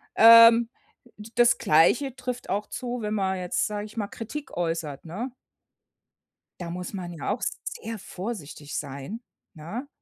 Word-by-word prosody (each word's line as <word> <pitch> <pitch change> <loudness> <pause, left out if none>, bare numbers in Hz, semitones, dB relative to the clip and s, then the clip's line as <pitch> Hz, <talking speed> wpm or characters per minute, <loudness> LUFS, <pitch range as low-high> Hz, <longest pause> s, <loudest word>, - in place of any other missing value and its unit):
Ähm, 230 +1 +9 0.5
d 210 +2 -11
das 240 0 +5
Gleiche 235 - +3
trifft 250 -1 -5
auch 205 +2 -1
zu, 245 -1 -4
wenn 210 0 -2
man 190 -2 0
jetzt, 180 -1 -1
sage 210 0 -4
ich 215 - -16
mal, 205 -2 -1
Kritik 260 +8 -7
äußert, 165 -5 -3
ne? 220 +10 -6 1.3
Da 175 - -5
muss 180 +3 -6
man 180 -3 -5
ja 160 +3 -3
auch 215 - -2 0.2
sehr 230 - -6
vorsichtig 180 -8 -6
sein, 140 +11 -6 0.3
ne? 200 - -7
210 Hz, 150 wpm, -26 LUFS, 175-235 Hz, 1.3 s, Ähm